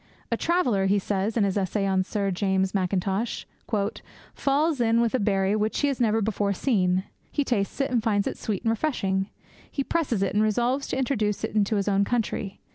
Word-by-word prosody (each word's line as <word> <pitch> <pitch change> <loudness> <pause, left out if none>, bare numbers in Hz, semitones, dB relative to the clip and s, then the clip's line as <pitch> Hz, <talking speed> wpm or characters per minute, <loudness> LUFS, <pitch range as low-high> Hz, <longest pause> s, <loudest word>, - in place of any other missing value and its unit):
'A - - +1
traveller,' 250 - +1
he 200 +1 +3
says 200 +3 -1
in 220 - +3
his 200 0 +1
essay 195 +1 -1
on 190 -1 +2
Sir 200 0 -1
James 190 0 0
Mackintosh, 195 +3 -1 0.9
'falls 285 0 +1
in 230 0 +3
with 235 -1 +2
a 260 - +2
berry 195 0 +1
which 215 +1 0
he 290 - +3
has 270 -3 -2
never 220 -1 +2
before 205 -1 0
seen. 185 -5 +1 0.3
He 290 - +1
tastes 220 -5 -1
it, 275 -1 0
and 240 -2 +2
finds 205 -2 +1
it - - -2
sweet 205 -4 -3
and 225 - +2
refreshing. 195 -7 -1 0.4
He 275 - -2
presses 265 - 0
it, 195 - -1
and 210 - +3
resolves 240 +6 +1
to - - -2
introduce 225 -6 0
it - - -2
into 210 0 +2
his 200 -1 0
own 200 0 +3
country. 205 -3 -2
210 Hz, 200 wpm, -26 LUFS, 195-240 Hz, 0.9 s, he